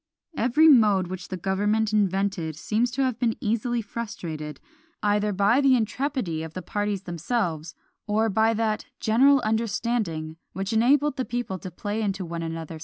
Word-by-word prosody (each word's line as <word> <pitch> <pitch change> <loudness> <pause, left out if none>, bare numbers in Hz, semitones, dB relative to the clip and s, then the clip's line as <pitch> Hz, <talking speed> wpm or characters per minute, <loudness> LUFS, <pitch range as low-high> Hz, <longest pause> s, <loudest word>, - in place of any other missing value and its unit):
Every 265 +6 +4
mode 210 - +5
which 185 -1 -6
the 185 - -5
government 205 +4 0
invented 195 -5 0
seems 220 +9 0
to 265 +3 -1
have 255 -3 -1
been 230 -3 +1
easily 230 +2 -1
frustrated, 170 -10 -6 0.4
either 210 0 +2
by 205 +7 +3
the 270 -2 +5
intrepidity 230 - -1
of 160 -1 -8
the 185 - -5
parties 205 -1 -2
themselves, 170 -2 -2 0.3
or 215 +2 +2
by 220 +2 +2
that 215 -1 -1
general 265 +5 +4
understanding 215 -7 -1 0.2
which 195 +2 -3
enabled 280 +6 +3
the 260 - 0
people 240 -6 -3
to 185 - -7
play 205 +5 -4
into 195 -3 -2
one 170 0 -5
another's 165 -1 -5
hands. 160 - -7
210 Hz, 165 wpm, -25 LUFS, 185-235 Hz, 0.4 s, mode